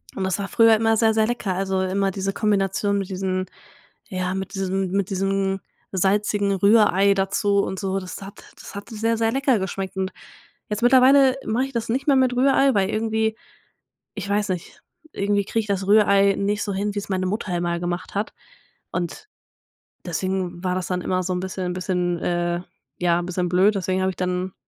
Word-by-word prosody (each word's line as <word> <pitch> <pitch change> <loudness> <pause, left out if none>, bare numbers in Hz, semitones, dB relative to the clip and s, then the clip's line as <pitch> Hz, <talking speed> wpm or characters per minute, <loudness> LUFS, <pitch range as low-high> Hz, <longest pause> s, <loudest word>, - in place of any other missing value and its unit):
und 195 - -3
das 190 -1 0
war 200 - -3
früher 225 +1 +5
immer 225 0 +2
sehr, 220 0 +3
sehr 220 0 +3
lecker, 235 -5 -2
also, 190 0 -1
immer 195 +1 0
diese 195 +1 -3
Kombination 200 -1 +1
mit 195 - -4
diesen 185 -1 -2 0.6
ja, 185 -2 -2
mit 190 0 -5
diesem 190 -1 -1
mit 195 -1 0
diesem 195 0 0 0.3
salzigen 200 +2 +1
Rührei 200 0 +4
dazu 200 +1 +1
und 190 - -4
so, 195 -1 -1
das 185 0 -8
hat 195 +1 -11
das - - -12
hat 200 - -7
sehr, 225 0 -1
sehr 225 0 +1
lecker 270 -1 +2
geschmeckt 190 0 -4
und 190 0 -2 0.6
jetzt 210 +2 -3
mittlerweile 260 +1 +6
mache 240 +4 0
ich 270 - -10
das 230 -1 -3
nicht 260 +4 -1
mehr 280 - +5
mit 255 -1 +2
Rührei, 270 +1 +4
weil 195 -1 +2
irgendwie 220 0 0 0.8
ich - - -5
weiß 205 0 0
nicht, 180 -2 -5 0.3
irgendwie 200 0 0
kriege 225 - 0
ich 215 - -9
das 195 -1 -1
Rührei 200 -1 +5
nicht 205 +1 0
so 200 - -3
hin, 200 +2 -2
wie - - 0
es 200 - -8
meine 185 -1 -1
Mutter 200 -2 -2
immer 170 0 -1
gemacht 175 +2 -4
hat 205 +2 -2 0.6
und 180 - -4 0.8
deswegen 185 0 -3
war 180 -1 0
das 185 - -2
dann 180 -1 -2
immer 185 +1 0
so 185 - -2
'n 180 - -2
bisschen 185 -1 -3
bisschen, 180 -1 -1
äh, 175 0 -1 0.4
ja 175 -1 +2
'n 175 - -5
bisschen 180 0 -1
blöd, 190 +4 +4
deswegen 185 0 -1
habe 190 - +1
ich 185 - -9
dann 180 0 -2
195 Hz, 195 wpm, -23 LUFS, 185-215 Hz, 0.8 s, mittlerweile